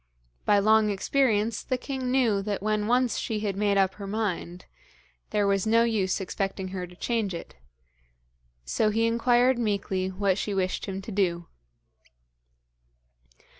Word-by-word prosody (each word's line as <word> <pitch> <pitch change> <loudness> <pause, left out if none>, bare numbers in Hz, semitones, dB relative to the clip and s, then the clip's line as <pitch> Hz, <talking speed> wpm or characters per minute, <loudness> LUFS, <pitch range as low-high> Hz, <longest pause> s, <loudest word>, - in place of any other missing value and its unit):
By 205 - +4
long 215 +1 +4
experience 220 +1 +1
the 255 - -2
king 260 -1 -4
knew 240 -6 +2
that 200 -1 -3
when 215 -1 0
once 245 -1 +2
she 215 -2 -3
had 205 -3 -2
made 200 0 +1
up 190 -1 +3
her 200 0 -8
mind, 195 -4 -3 0.6
there 205 -1 +1
was 200 +1 +1
no 230 +1 +4
use 210 -5 0
expecting 190 0 -3
her 185 -1 -5
to 180 - -15
change 215 -2 -1
it, 170 - -8 1.1
so 215 - +1
he 225 +2 +1
inquired 240 +2 +3
meekly 200 -4 -1
what 190 0 0
she 205 - -2
wished 185 +1 -1
him 195 0 -5
to 220 - -7
do. 175 -4 0
205 Hz, 150 wpm, -27 LUFS, 190-230 Hz, 1.1 s, By